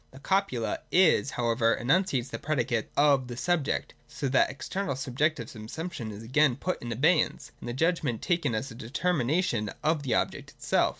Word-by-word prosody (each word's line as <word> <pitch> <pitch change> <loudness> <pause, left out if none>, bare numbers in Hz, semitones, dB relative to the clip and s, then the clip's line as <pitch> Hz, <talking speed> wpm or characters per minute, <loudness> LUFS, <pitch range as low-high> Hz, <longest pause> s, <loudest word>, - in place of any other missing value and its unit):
The 130 - -15
copula 140 - 0
'is' 180 -5 +4
however 115 -2 +1
enunciates 135 -2 +1
the - - -5
predicate 125 -6 -1
of 140 -3 +4
the 120 -1 -7
subject, 165 -1 0 0.2
and - - -24
so 140 - -3
that 130 - +4
external 185 +5 -3
subjective 135 0 -1
subsumption 115 +3 -6
is 105 +2 -9
again 130 +2 +3
put 180 +7 -3
in 120 - -5
abeyance, 150 +8 +1
and 120 - -7
the - - -3
Judgment 150 -5 0
taken 170 -10 0
as 135 +5 -3
a - - -8
deter 130 +10 -1
mination 125 - 0
of 155 -1 +2
the 130 -5 0
object - - -1
itself. - - +2
135 Hz, 180 wpm, -28 LUFS, 120-160 Hz, 0.2 s, is